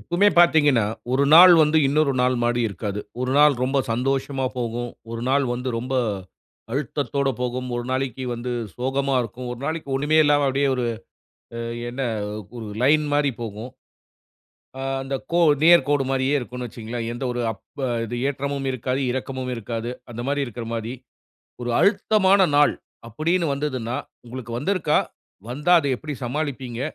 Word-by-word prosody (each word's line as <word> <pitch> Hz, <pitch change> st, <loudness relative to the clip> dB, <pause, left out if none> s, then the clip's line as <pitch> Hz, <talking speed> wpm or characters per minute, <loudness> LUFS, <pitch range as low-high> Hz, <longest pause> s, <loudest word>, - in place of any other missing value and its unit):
எப்பவுமே 180 Hz, +4 st, +3 dB
பார்த்தீங்கன்னா, 150 Hz, -9 st, +5 dB, 0.3 s
ஒரு 135 Hz, +2 st, +3 dB
நாள் 175 Hz, +3 st, +10 dB
வந்து, 155 Hz, +1 st, +3 dB
இன்னொரு 145 Hz, 0 st, +2 dB
நாள் 125 Hz, 0 st, +2 dB
மாரி 120 Hz, 0 st, +1 dB
இருக்காது. 100 Hz, +1 st, -4 dB, 0.2 s
ஒரு 130 Hz, 0 st, -1 dB
நாள் 150 Hz, -1 st, +6 dB
ரொம்ப 135 Hz, +2 st, +1 dB
சந்தோஷமா 135 Hz, +2 st, -1 dB
போகும். 120 Hz, 0 st, -3 dB, 0.2 s
ஒரு 115 Hz, 0 st, -5 dB
நாள் 140 Hz, +1 st, +3 dB
வந்து 125 Hz, +1 st, -3 dB
ரொம்ப 130 Hz, +3 st, -4 dB, 0.8 s
அழுத்தத்தோடு 140 Hz, 0 st, -1 dB
போகும். 125 Hz, +1 st, -2 dB
ஒரு 120 Hz, -, -3 dB
நாளைக்கு 130 Hz, -1 st, -2 dB
வந்து 120 Hz, +1 st, -5 dB, 0.2 s
சோகமா 135 Hz, +2 st, -1 dB
இருக்கும். 120 Hz, +2 st, -7 dB
ஒரு 125 Hz, -, -8 dB
நாளைக்கு 160 Hz, -1 st, -3 dB
ஒன்னுமே 150 Hz, +3 st, +2 dB
இல்லாம, 145 Hz, -1 st, +3 dB
அப்டியே 140 Hz, +1 st, +1 dB
ஒரு 125 Hz, -1 st, -1 dB, 0.7 s
அ -, -, -4 dB, 0.3 s
என்ன 125 Hz, +3 st, -4 dB, 0.5 s
ஒரு 115 Hz, -2 st, -6 dB, 0.2 s
லைன் 150 Hz, +3 st, +4 dB
மாரி 145 Hz, -1 st, +2 dB
போகும். 110 Hz, +2 st, -6 dB, 1.1 s
ஆ -, -, -5 dB, 0.2 s
அந்த 135 Hz, +1 st, -4 dB, 0.2 s
கோ 175 Hz, -, +3 dB, 0.3 s
நேர் 170 Hz, -5 st, +7 dB
கோடு 145 Hz, -2 st, +2 dB
மாரியே 135 Hz, +1 st, +1 dB
இருக்கும்னு 125 Hz, -1 st, -6 dB
வச்சுக்கோங்களேன். 115 Hz, +1 st, -5 dB
எந்த 120 Hz, -, -5 dB
ஒரு 120 Hz, -, -3 dB
அப்பு 135 Hz, +7 st, -9 dB, 0.2 s
இது 120 Hz, +2 st, -5 dB
ஏற்றமும் 140 Hz, 0 st, -3 dB
இருக்காது, 130 Hz, +2 st, -2 dB
இரக்கமும் 130 Hz, 0 st, -4 dB
இருக்காது. 115 Hz, +1 st, -4 dB, 0.2 s
அந்த 115 Hz, -, -6 dB
மாரி, 140 Hz, 0 st, 0 dB
இருக்குற 120 Hz, -1 st, -7 dB
மாரி. 115 Hz, +2 st, -4 dB, 0.7 s
ஒரு 120 Hz, -, -2 dB
அழுத்தமான 200 Hz, -1 st, +4 dB
நாள் 145 Hz, 0 st, +5 dB, 0.4 s
அப்படீன்னு 165 Hz, +6 st, 0 dB
வந்ததுன்னா, 130 Hz, -4 st, -3 dB, 0.3 s
உங்களுக்கு 120 Hz, -1 st, -7 dB
வந்திருக்கா? 155 Hz, 0 st, +1 dB, 0.5 s
வந்தா 150 Hz, +8 st, +3 dB
அத 145 Hz, -, -2 dB
எப்பிடி 150 Hz, +2 st, -6 dB
சமாளிப்பீங்க? 130 Hz, -3 st, -3 dB
135 Hz, 150 wpm, -23 LUFS, 120-145 Hz, 1.1 s, நாள்